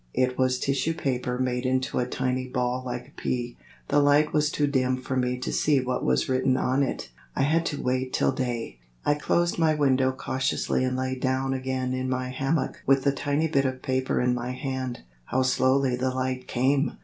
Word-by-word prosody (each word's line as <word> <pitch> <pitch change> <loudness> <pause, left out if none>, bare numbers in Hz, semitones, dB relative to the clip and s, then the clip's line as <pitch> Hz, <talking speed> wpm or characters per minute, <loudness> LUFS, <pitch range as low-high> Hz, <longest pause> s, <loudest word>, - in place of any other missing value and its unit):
It 125 0 +2
was 130 -1 +2
tissue 140 +4 0
paper 125 -4 -1
made 125 -1 -1
into 130 0 0
a 125 - 0
tiny 130 0 -1
ball 125 0 -1
like 125 -1 -5
a - - -22
pea. 120 -1 -2 0.3
The 145 - +4
light 145 +1 +4
was 150 -1 +3
too 150 - +1
dim 130 -2 +1
for 130 +1 -4
me 125 -1 0
to 125 - -4
see 150 -2 +3
what 125 0 -2
was 65 0 +2
written 130 0 +2
on 130 +2 +1
it; 135 - -2 0.2
I - - +1
had 160 +4 +2
to 145 - -3
wait 130 0 -1
till - - +2
day. 120 - -3 0.3
I 145 - +4
closed 170 +4 0
my 160 -2 +3
window 135 -3 +3
cautiously 130 0 -1
and 130 0 0
lay 130 0 -1
down 130 +1 0
again 130 -1 -2
in 130 0 -2
my 130 0 -1
hammock 135 +5 -1
with 135 0 +4
the 140 - +3
tiny 145 +3 0
bit 140 -3 +1
of 130 -1 -3
paper 130 0 0
in 125 0 +2
my 125 +1 -3
hand. 130 -2 -4 0.2
How 130 - +1
slowly 130 0 +2
the 130 +1 0
light 130 0 -2
came! 135 +4 +1
130 Hz, 205 wpm, -26 LUFS, 125-135 Hz, 0.3 s, The